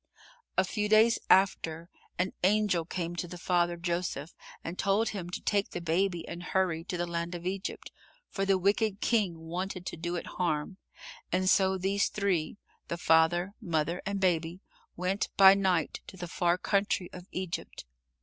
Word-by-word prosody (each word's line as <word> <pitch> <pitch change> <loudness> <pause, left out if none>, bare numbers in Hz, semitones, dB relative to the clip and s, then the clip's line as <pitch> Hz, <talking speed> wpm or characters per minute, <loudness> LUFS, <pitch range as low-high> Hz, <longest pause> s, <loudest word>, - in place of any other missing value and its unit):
A 190 - +5
few 210 +2 -2
days 220 +2 +5
after, 170 -4 +3 0.3
an 185 +1 0
angel 195 -3 +3
came 175 0 -4
to 175 - -2
the 180 +1 -8
father, 175 -1 +1
Joseph, 170 -3 -3 0.3
and 170 +2 -6
told 205 +3 +2
him 185 -4 -5
to 180 - -5
take 200 -1 0
the - - -5
Baby 175 +1 0
and 170 - -6
hurry 180 -2 0
to 180 - -3
the 175 - -1
land 170 0 -3
of 175 0 -7
Egypt, 190 +2 -4 0.4
for 195 - -3
the 195 -1 +3
wicked 200 +2 +1
King 205 -9 +1
wanted 180 +3 -5
to - - -5
do 170 +2 -3
it 175 - -4 0.2
harm, 170 +2 -1 0.5
and 185 +1 +1
so 190 0 +4
these 195 +2 +1
three 195 -5 -1 0.3
the 170 - -3
father, 175 +3 +3
mother 170 -2 -1
and 200 0 -2
Baby 175 -2 +1 0.4
went 185 +3 -1
by 195 -1 +10
night 190 -5 0
to 190 - -11
the 175 -1 -5
far 175 +1 +1
country 195 -1 0
of 180 0 -10
Egypt. 185 - -5
180 Hz, 170 wpm, -30 LUFS, 170-195 Hz, 0.5 s, by